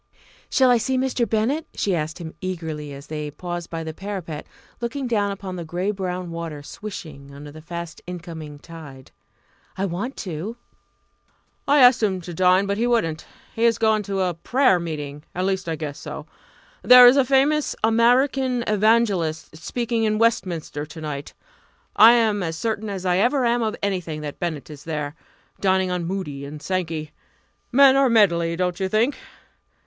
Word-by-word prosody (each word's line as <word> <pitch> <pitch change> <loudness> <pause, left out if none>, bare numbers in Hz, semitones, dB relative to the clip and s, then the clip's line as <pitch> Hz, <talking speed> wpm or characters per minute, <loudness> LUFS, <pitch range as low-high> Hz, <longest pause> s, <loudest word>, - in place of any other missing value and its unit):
"Shall 260 -2 +4
I 245 - +5
see 260 +3 0
Mr. 255 -3 0
Bennett?" 235 +9 0
she 200 - 0
asked 155 -1 -3
him 165 -3 -8
eagerly, 160 -5 -5
as 140 +1 -9
they 150 -1 -5
paused 175 +3 -6
by 165 -1 -4
the 160 0 -5
parapet, 180 -5 -6 0.3
looking 255 +3 -3
down 210 -4 +1
upon 195 -2 -6
the 170 - -5
grey 175 +5 -2
brown 180 -3 -4
water 165 -3 -6
swishing 150 -7 -9
under 145 +1 -10
the 155 +1 -11
fast 170 0 -7
incoming 165 -4 -7
tide. 145 -4 -12 0.7
"I 195 - 0
want 200 +9 -4
to." 185 +5 -5 1.1
"I 285 0 +5
asked 250 -1 +7
him 195 -4 +1
to 175 0 -8
dine, 185 +3 +4
but 200 +1 -2
he 240 - +2
wouldn't. 165 -10 0 0.3
He 225 - -2
has 230 -2 +3
gone 220 -1 +2
to 195 -1 0
a 180 -1 +1
prayer 215 - +2
meeting 150 -3 -5
at 180 +1 -1
least 190 -2 -1
I 165 - -1
guess 150 -2 -6
so. - - -7 0.6
There 250 0 +9
is 245 +2 +8
a 275 - +5
famous 275 +3 +2
American 245 +3 +3
evangelist 205 -8 +1
speaking 230 +7 -2
in 215 0 +1
Westminster 180 -9 0
to 155 +2 -10
night 145 -2 -6 0.6
I 225 +3 +9
am 220 -4 +2
as 165 -2 -3
certain 220 +1 -2
as 190 -2 -5
I 180 -1 +2
ever 250 +4 +2
am 240 +1 +2
of 220 -1 -1
anything 180 -6 -2
that 145 -1 -7
Bennett 160 -4 -4
is 145 -1 -11
there 150 -3 -4 0.5
dining 190 -1 +2
on 180 -2 -2
Moody 165 -7 -4
and 145 +2 -8
Sankey. 160 -3 -3 0.6
Men 270 +1 +7
are 275 0 +4
a - - +1
medley, 170 -7 +3
don't 180 +1 -1
you 190 -1 -1
think? 230 +7 +2
185 Hz, 175 wpm, -23 LUFS, 160-230 Hz, 1.1 s, There